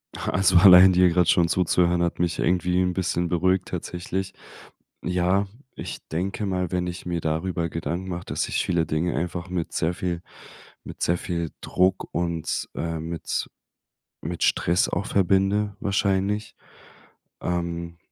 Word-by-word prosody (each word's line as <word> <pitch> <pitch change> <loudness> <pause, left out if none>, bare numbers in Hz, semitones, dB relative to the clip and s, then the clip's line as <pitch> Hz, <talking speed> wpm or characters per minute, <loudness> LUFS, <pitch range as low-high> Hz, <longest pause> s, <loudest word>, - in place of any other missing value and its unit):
Also, 95 -1 +2
allein 95 0 +9
dir 90 0 +5
gerade 90 0 +2
schon 85 -1 +4
zuzuhören, 90 0 +2
hat 85 -1 -1
mich 85 -1 0
irgendwie 90 0 +1
'n 90 -1 +1
bisschen 90 -1 -1
beruhigt 95 +2 +1
tatsächlich. 90 +2 -4 0.7
Ja, 90 +3 +1 0.3
ich - - -6
denke 95 +6 -2
mal, 90 -3 -2
wenn 90 -1 -1
ich 90 +1 -6
mir 85 -1 -2
darüber 85 +2 -1
Gedanken 85 +3 -4
mache, 90 0 -5
dass - - -2
ich - - 0
viele 85 -3 +1
Dinge 80 +2 -1
einfach 85 +3 -3
mit 90 -2 -3
sehr 80 +2 0
viel 85 -1 -3 0.6
mit - - -10
sehr 85 +1 +2
viel 85 -2 -3
Druck 90 +1 +1
und, 85 -2 -2
äh, 80 -1 -3
mit 80 0 -3 0.7
mit - - -5
Stress 85 +2 +2
auch 95 +3 -2
verbinde, 100 +2 +1
wahrscheinlich, 100 +1 0 0.9
ähm 85 -1 -3
90 Hz, 145 wpm, -24 LUFS, 85-95 Hz, 0.9 s, allein